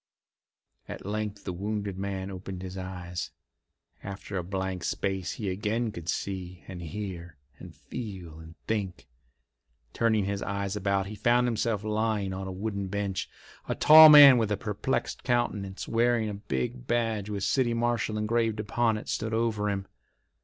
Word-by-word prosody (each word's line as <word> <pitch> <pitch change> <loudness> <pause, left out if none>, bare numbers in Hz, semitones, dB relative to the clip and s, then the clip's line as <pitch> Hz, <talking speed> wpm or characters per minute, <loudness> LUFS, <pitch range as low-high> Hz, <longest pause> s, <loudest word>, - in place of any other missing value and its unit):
At - - -7
length 105 0 -3
the 90 - -4
wounded 100 +1 -3
man 95 0 -4
opened 95 0 -7
his 95 0 -7
eyes. 90 -2 -5 0.7
After 100 +1 -7
a 90 - -1
blank 95 -1 -3
space 95 -2 -2
he 105 - -5
again 110 +4 -1
could 85 -3 -7
see 90 -3 -4
and 90 -2 -7
hear 85 -2 -6 0.2
and - - -11
feel 95 -9 -8
and 80 +1 -12
think. 100 -5 -3 0.9
Turning 110 -3 +2
his 100 0 -2
eyes 100 0 -2
about, 100 -1 0
he 100 - -7
found 120 +4 +2
himself 115 -3 0
lying 105 -2 -1
on 95 0 -5
a - - -4
wooden 100 +1 -3
bench. 100 -1 -3 0.4
A - - 0
tall 155 0 +10
man 145 -4 +10
with 110 -2 0
a 105 - +1
perplexed 110 +5 -2
countenance, 105 -6 -1
wearing 115 -1 +2
a - - -4
big 120 +5 -4
badge 115 -4 0
with 100 -2 -3
"City 120 +1 +1
Marshal" 115 -2 0
engraved 110 0 0
upon 110 +1 +1
it, 105 - -8
stood 110 0 -2
over 110 -2 0
him. 100 -1 -2
105 Hz, 160 wpm, -28 LUFS, 95-115 Hz, 0.9 s, tall